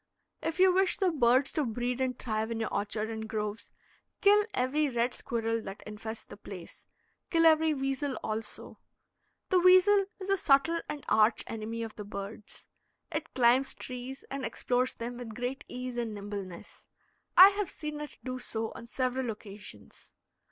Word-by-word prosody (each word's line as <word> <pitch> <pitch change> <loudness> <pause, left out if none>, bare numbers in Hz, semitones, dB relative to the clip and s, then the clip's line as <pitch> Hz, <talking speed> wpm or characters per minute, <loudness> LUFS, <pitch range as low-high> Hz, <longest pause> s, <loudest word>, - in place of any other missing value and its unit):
If 325 - -2
you 370 0 +6
wish 380 0 +3
the 380 -2 +2
birds 260 -2 +3
to 305 - 0
breed 245 +1 -2
and 255 -1 0
thrive 220 -2 -2
in 230 -1 -3
your 225 - -2
orchard 215 +2 -2
and 220 0 -5
groves, 210 0 -4 0.5
kill 415 +1 +6
every 285 +4 +1
red 240 0 0
squirrel 230 -1 -2
that 195 -1 -8
infests 220 +1 -6
the - - -12
place; 190 -4 -10 0.4
kill 330 -1 +3
every 315 -1 +5
weasel 270 0 -1
also. 220 +1 -4 0.7
The 370 - +4
weasel 370 +2 +6
is 390 0 -3
a 390 - +4
subtle 330 +2 +3
and 290 - -5
arch 215 +1 +4
enemy 225 +1 -4
of 225 -1 -7
the 210 - -5
birds. 205 +1 -7 0.5
It 315 0 -3
climbs 255 +2 +4
trees 255 +1 -7
and 275 -1 -3
explores 250 0 0
them 240 +1 -5
with 230 -3 -7
great 250 +3 -3
ease 250 0 -5
and 230 -3 -2
nimbleness. 200 -3 -8 0.5
I 375 +2 +12
have 405 -2 -2
seen 300 -1 -5
it 300 - -8
do 255 0 -4
so 225 -2 -3
on 235 - -10
several 255 0 -1
occasions. 210 -1 -10
245 Hz, 165 wpm, -30 LUFS, 220-300 Hz, 0.7 s, I